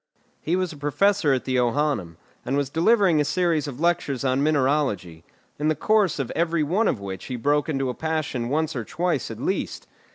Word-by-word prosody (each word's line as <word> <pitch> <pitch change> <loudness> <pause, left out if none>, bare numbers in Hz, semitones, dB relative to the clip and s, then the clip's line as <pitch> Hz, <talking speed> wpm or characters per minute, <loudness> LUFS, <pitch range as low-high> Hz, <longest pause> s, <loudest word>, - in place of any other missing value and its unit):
He 165 - 0
was 185 -2 -1
professor 150 +3 +1
at 130 -2 0
the 130 -1 0
Johannæum, 120 - 0 0.3
and 135 - -1
was 140 -1 -1
delivering 175 -1 +3
a - - +3
series 160 0 0
of 135 -2 -7
lectures 165 -6 0
on 130 +1 +1
mineralogy, 135 - 0 0.4
in 150 - 0
the 155 - +2
course 210 +1 +2
of 135 -4 -3
every 165 -1 0
one 190 +9 +1
of 115 - 0
which 95 -2 -7
he 130 - -4
broke 145 +5 +1
into 135 -3 -1
a 125 - -2
passion 155 -6 -2
once 155 +2 0
or 120 - -2
twice 165 +3 -2
at - - -7
least. - - -2
145 Hz, 195 wpm, -24 LUFS, 130-165 Hz, 0.4 s, delivering